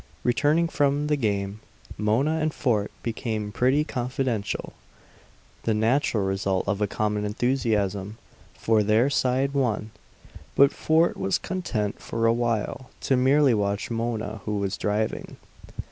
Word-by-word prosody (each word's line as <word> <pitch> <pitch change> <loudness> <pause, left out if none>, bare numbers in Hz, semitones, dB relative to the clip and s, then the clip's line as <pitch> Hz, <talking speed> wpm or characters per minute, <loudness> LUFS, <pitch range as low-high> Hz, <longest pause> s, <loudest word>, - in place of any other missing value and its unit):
Returning 150 +7 +2
from 145 -2 +1
the 150 0 +2
game, 100 -5 -1 0.4
Mona 130 +10 +1
and 155 0 0
Fort 110 -7 +1
became 110 -2 -3
pretty 130 +7 +2
confidential, 125 -5 -2 0.9
the 110 - 0
natural 110 -1 +2
result 95 -1 -1
of 105 0 -1
a 105 - +2
common 105 +1 -1
enthusiasm; 105 -3 -1 0.4
for 110 -1 +2
their 110 +6 +3
side 135 0 +1
won. 115 -6 0 0.6
But 140 0 +6
Fort 160 +2 +2
was 190 -1 +1
content 125 - -3
for 115 - -2
a 115 - +5
while 120 +2 -2
to 135 - +2
merely 135 +1 +4
watch 100 0 -1
Mona, 115 -2 -3
who 105 -1 -1
was 100 -1 -1
driving. 105 +1 -2
115 Hz, 130 wpm, -25 LUFS, 105-135 Hz, 0.9 s, But